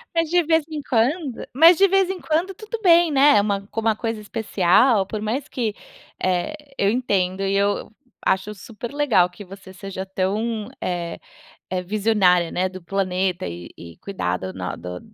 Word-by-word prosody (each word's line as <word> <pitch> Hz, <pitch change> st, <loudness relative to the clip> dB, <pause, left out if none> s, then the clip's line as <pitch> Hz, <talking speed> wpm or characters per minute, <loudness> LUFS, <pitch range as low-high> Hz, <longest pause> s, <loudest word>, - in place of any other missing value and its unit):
Mas 330 Hz, -1 st, +1 dB
de 350 Hz, +1 st, +3 dB
vez 320 Hz, 0 st, +2 dB
em 305 Hz, -2 st, -4 dB
quando 265 Hz, +2 st, 0 dB
mas 330 Hz, +6 st, +7 dB
de 395 Hz, -, +6 dB
vez 385 Hz, -1 st, +2 dB
em 380 Hz, -1 st, -3 dB
quando, 335 Hz, +4 st, -1 dB
tudo 435 Hz, +4 st, -7 dB
bem, 340 Hz, -2 st, +5 dB
né. 285 Hz, +1 st, +5 dB
É -, -, +5 dB
uma 200 Hz, -1 st, -2 dB
co 225 Hz, -, -4 dB
uma 220 Hz, -1 st, +2 dB
coisa 225 Hz, -1 st, -3 dB
especial, 210 Hz, +1 st, +2 dB
por 210 Hz, +2 st, -5 dB
mais 245 Hz, +7 st, -2 dB
que, 225 Hz, -5 st, -3 dB, 0.5 s
eh, 185 Hz, +9 st, 0 dB, 0.2 s
eu 200 Hz, -, +2 dB
entendo 195 Hz, -6 st, 0 dB
e 195 Hz, 0 st, 0 dB
eu 200 Hz, +1 st, 0 dB, 0.3 s
acho 190 Hz, +3 st, 0 dB
super 215 Hz, +3 st, -9 dB
legal 250 Hz, -12 st, +3 dB
que 200 Hz, +3 st, -12 dB
você 195 Hz, 0 st, -12 dB
seja 190 Hz, 0 st, -6 dB
tão, 205 Hz, +3 st, -2 dB
eh, 175 Hz, -2 st, -3 dB, 0.5 s
eh, 185 Hz, 0 st, -1 dB
visionária, 190 Hz, -4 st, +2 dB
né, 185 Hz, +1 st, 0 dB
da 185 Hz, 0 st, -9 dB
do -, -, -24 dB
planeta 185 Hz, -1 st, -1 dB
e 85 Hz, 0 st, -8 dB
e 85 Hz, -1 st, -11 dB
cuidar 90 Hz, -, -3 dB
do 95 Hz, +1 st, -6 dB
no 90 Hz, 0 st, -4 dB
do 90 Hz, +1 st, -7 dB
205 Hz, 185 wpm, -22 LUFS, 185-275 Hz, 0.5 s, mas